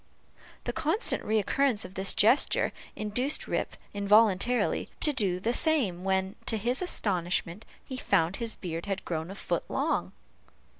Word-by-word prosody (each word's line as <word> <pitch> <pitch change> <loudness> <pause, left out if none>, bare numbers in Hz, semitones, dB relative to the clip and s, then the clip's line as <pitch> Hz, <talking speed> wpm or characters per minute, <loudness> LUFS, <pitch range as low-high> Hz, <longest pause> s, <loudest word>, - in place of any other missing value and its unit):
The - - -3
constant 330 +7 +1
recurrence 220 +3 +1
of 185 - -10
this 190 0 +1
gesture, 225 +6 +3 0.2
induced 245 +7 0
Rip, - - -2 0.2
involuntarily, 210 +3 +3
to 300 - +5
do, 195 -8 0
the 230 +5 0
same, 240 - +2
when, 190 +1 0
to 225 - +1
his 240 - -1
astonishment, 185 - -1 0.2
he 260 - -6
found 185 -6 +1
his 230 -2 -3
beard 170 0 -6
had 195 -1 -3
grown 160 0 -3
a 195 - -7
foot - - -2
long! - - -1
205 Hz, 145 wpm, -28 LUFS, 190-245 Hz, 0.2 s, to